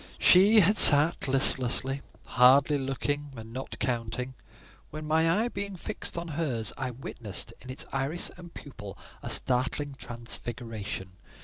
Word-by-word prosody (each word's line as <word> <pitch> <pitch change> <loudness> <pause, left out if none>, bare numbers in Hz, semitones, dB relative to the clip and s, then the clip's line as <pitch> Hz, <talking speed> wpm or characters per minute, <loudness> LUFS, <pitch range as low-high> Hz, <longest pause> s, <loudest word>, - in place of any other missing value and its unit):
She 205 +4 +5
had 200 +3 +2
sat 150 0 +6
listlessly, 135 0 +3 0.2
hardly 135 +3 +4
looking, 145 +2 -4
and 115 0 -11
not 130 +1 -7
counting, 125 +1 -3 0.6
when—my 155 +2 -1
eye - - -1
being 200 -2 -6
fixed 170 - -3
on 170 0 -5
hers—I 130 -5 -3
witnessed 115 -4 -5
in 130 - -13
its 130 - -3
iris 135 +6 -2
and 175 -1 -13
pupil 105 -12 -11 0.2
a - - -7
startling 135 +3 -1
transfiguration. 115 -6 -6
135 Hz, 125 wpm, -27 LUFS, 120-155 Hz, 0.6 s, sat